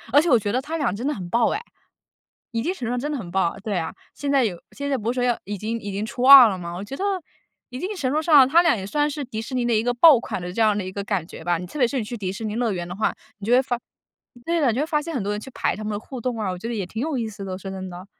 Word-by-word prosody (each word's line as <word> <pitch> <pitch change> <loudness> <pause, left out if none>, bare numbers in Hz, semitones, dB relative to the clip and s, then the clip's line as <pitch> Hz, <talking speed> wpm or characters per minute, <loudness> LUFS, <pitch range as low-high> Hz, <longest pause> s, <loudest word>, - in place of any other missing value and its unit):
而 290 - +7
且 345 - -1
我 245 - +6
觉 205 -1 -2
得 255 - +1
他 310 +4 -4
俩 285 - 0
真 240 +6 -4
的 300 - +1
很 180 -4 -7
爆 235 +5 +2
哎， 425 - -2 0.9
一 230 - -1
定 350 - 0
程 245 - -5
度 - - -2
上 245 - -1
真 295 +4 -3
的 295 - -2
很 180 -6 -7
爆， 185 -1 0
对 210 -3 -2
啊， 160 -1 -4 0.2
现 285 - -3
在 275 -3 +4
有 180 -6 -2
现 280 0 -5
在 270 - +2
不 225 +3 -1
是 - - -8
说 - - +1
要 240 -1 +1
已 205 +1 -4
经 220 +4 -3
已 205 -1 -6
经 200 +2 -2
出 245 +2 -5
2 265 -3 +11
了 190 -3 -3
吗？ 170 0 -6
我 190 +3 -5
觉 270 +6 -7
得 390 - -3 0.7
一 250 - -6
定 380 +8 -3
程 265 -5 -1
度 305 - +2
上， 290 -5 +7
他 340 +5 +6
俩 330 -7 +3
也 195 -2 -5
算 295 +7 +1
是 290 -1 -4
迪 220 -3 -5
士 255 - -7
尼 250 -1 0
的 235 - +2
一 215 - +2
个 245 +1 0
爆 280 0 +8
款 - - -4
的 180 0 -5
这 225 - -3
样 215 -2 +4
的 205 - -2
一 185 - -6
个 200 - -4
感 195 -5 -1
觉 165 - -10
吧。 175 -1 +1
你 180 - -6
特 240 - -8
别 245 -4 +4
是 270 +1 -2
你 225 - -2
去 235 +3 -6
迪 190 -4 -3
士 220 +3 -7
尼 210 - -3
乐 235 -3 0
园 175 -2 -4
的 180 - -6
话， 215 - 0 0.2
你 205 - -8
就 235 - +1
会 255 +2 +6
发 245 -2 -2 0.7
对 335 0 +1
的， 285 - +3
哎， - - +4
你 - - -4
就 275 - +1
会 - - -1
发 300 -2 +1
现 330 +1 -6
很 245 - -1
多 205 +1 -2
人 210 - -3
去 265 - -10
排 - - 0
他 215 - -7
们 215 - -2
的 205 - -2
互 255 +2 -8
动 245 -1 -2
啊。 205 -3 -1
我 180 - -5
觉 230 - -5
得 240 - -3
也 200 -4 -2
挺 220 - -6
有 310 -1 -1
意 225 - -2
思 200 -2 -8
的， 190 - -5
我 185 - -4
说 195 0 -7
真 190 -1 -6
的。 180 +2 -9
230 Hz, 390 characters per minute, -23 LUFS, 195-270 Hz, 0.9 s, 2